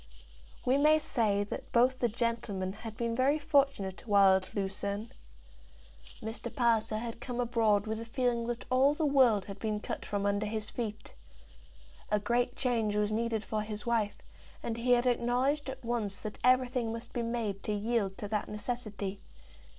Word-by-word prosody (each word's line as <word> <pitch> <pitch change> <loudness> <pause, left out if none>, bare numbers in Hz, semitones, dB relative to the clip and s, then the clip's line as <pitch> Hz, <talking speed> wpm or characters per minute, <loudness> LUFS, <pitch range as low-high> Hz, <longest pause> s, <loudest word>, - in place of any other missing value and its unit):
We 260 +2 +3
may 305 +2 +6
say 220 -9 +1
that 205 - -7
both 255 +2 +3
the 240 - +3
gentlemen 220 -5 -2
had 220 +1 -8
been 230 -1 -1
very 270 +4 +3
fortunate 275 -11 +1
while 200 -2 +6
at 185 - -8
Lucerne. 200 +2 -3 1.1
Mr. 220 +1 -5
Palliser 230 -4 +2
had 230 +1 -5
come 245 -2 -4
abroad 225 -4 +2
with 220 0 -3
a 230 - -6
feeling 235 -1 0
that 240 -1 -3
all 270 +3 +4
the 315 - 0
world 255 -8 +4
had 200 0 -8
been 215 -1 -1
cut - - -5
from 200 -1 -2
under 205 +1 +1
his 215 0 -4
feet. 215 -3 -5 1.0
A 210 - +2
great 240 +4 0
change 225 -5 0
was 210 0 +1
needed 225 0 0
for 215 -1 -2
his 210 -1 -6
wife, 225 -3 0 0.5
and 230 - -2
he 245 +1 +3
had 240 0 +3
acknowledged 250 +4 +1
at 265 -2 -7
once 220 -5 -1
that 215 - -6
everything 250 -2 +3
must 230 +1 -7
be 240 - -1
made 230 -4 -2
to - - -3
yield 210 -2 0
to 205 - -5
that 210 -1 -1
necessity. 210 -3 -4
230 Hz, 175 wpm, -31 LUFS, 210-245 Hz, 1.1 s, may